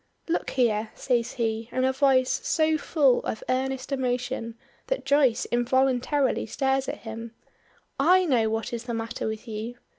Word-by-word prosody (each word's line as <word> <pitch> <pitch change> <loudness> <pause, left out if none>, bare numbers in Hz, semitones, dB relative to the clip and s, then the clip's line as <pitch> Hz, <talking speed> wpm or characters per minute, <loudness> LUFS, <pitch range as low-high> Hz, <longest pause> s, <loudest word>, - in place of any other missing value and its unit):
"Look 335 - -1
here!" 220 -3 +2
says 240 -2 0
he, 225 -1 -2
in 255 - 0
a 260 0 +2
voice 265 -2 +3
so 315 -1 +2
full 290 -4 +2
of 220 - -4
earnest 260 +1 -1
emotion 250 -3 -2 0.3
that - - -2
Joyce 275 -4 +3
involuntarily 260 +2 +1
stares 270 +3 0
at - - -6
him; 225 0 -8 0.6
"I 365 +6 +5
know 240 -8 +2
what 225 +1 -3
is 235 0 -4
the 235 -2 -3
matter 225 +1 -3
with 220 +2 -5
you. 225 +2 -5
250 Hz, 155 wpm, -26 LUFS, 230-270 Hz, 0.6 s, I